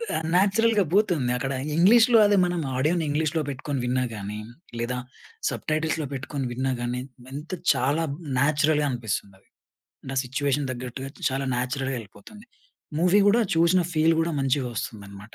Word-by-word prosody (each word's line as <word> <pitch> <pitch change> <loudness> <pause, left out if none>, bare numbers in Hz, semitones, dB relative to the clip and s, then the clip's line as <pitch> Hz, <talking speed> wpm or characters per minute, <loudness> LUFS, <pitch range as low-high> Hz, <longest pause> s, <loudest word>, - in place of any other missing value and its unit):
ఆహ్, 160 - -2
న్యాచురల్‌గా 205 +3 +3
బూతుంది 175 - +2
అక్కడ 135 +2 -2 0.2
ఇంగ్లీష్‌లొ 230 +7 +6
అదే 205 0 +4
మనం 175 -1 -1 0.2
ఆడియోని 160 +6 +1
ఇంగ్లీష్‌‌లొ 155 +2 0
పెట్టుకొని 140 0 -3
విన్నా 125 +1 +1
గానీ, 105 0 -5 0.4
లేదా 120 +2 -2 0.5
సబ్‌టైటిల్స్‌లొ 155 0 -1
పెట్టుకొని 140 0 -4
విన్నా 130 +2 -1
గానీ 120 +1 -2 0.3
ఎంత 150 +5 -7 0.2
చాలా 145 +6 0 0.3
నేచురల్‌గా 150 +2 +2
అనిపిస్తుందది. 100 -5 -5 0.6
నా - - -4
సిట్యుయేషన్ 140 +2 -1
తగ్గట్టుగా 130 +1 -6 0.2
చాలా 135 0 -2
నేచురల్‌గా 130 +2 -2
యెళ్ళిపోతుంది. 115 - -13 0.5
మూవీ 180 +4 +4
గూడా 225 +4 +5
చూసిన 170 +3 +4
ఫీల్ 160 +1 +3
గూడా 165 +1 0
మంచిగా 135 -1 0
వస్తుందనమాట. 100 0 -7
145 Hz, 135 wpm, -25 LUFS, 125-165 Hz, 0.6 s, ఇంగ్లీష్‌లొ